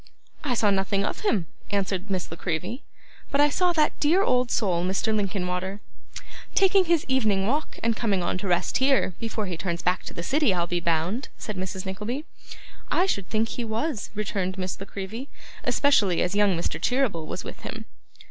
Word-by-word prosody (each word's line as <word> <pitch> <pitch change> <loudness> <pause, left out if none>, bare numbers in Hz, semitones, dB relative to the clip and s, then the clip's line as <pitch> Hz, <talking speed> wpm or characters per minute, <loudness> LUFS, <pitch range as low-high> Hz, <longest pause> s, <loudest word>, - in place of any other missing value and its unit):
'I 260 -5 0
saw 215 -2 +3
nothing 195 +1 +1
of - - -2
him,' 215 - +1 0.2
answered 195 -1 -1
Miss 185 -4 -2
La - - -4
Creevy; 180 - -3 0.5
'but 280 - 0
I 295 0 +6
saw 360 +2 +3
that 310 -2 +2
dear 340 +6 +4
old 250 -7 +2
soul 180 -8 +1
Mr. 195 +4 +1
Linkinwater.' 190 -1 -1 0.8
'Taking 385 -1 +5
his 335 -2 +2
evening 215 -7 +2
walk, 290 +8 -1
and 230 0 +2
coming 200 -5 +1
on 180 +1 -1
to 195 - -4
rest 175 -1 +2
here, 265 -7 +3
before 225 -2 -2
he 185 -2 -3
turns 170 -1 -3
back 180 +1 +2
to - - -6
the 170 - -4
city, 270 - +2
I'll 170 -1 +1
be 175 0 -1
bound!' 170 - 0
said 215 - -5
Mrs. 190 +1 -4
Nickleby. 210 +10 -3 0.6
'I 360 - +3
should 200 - -1
think 220 +1 +1
he 245 - -3
was,' 230 +2 -2
returned 195 -3 -2
Miss 185 -1 -3
La 195 - -5
Creevy; 220 +7 -6 0.3
'especially 210 -11 +3
as 180 - -1
young 200 -3 +3
Mr. 170 - -2
Cheeryble 245 -12 +1
was - - -4
with - - -8
him. - - -6
205 Hz, 190 wpm, -26 LUFS, 185-255 Hz, 0.8 s, I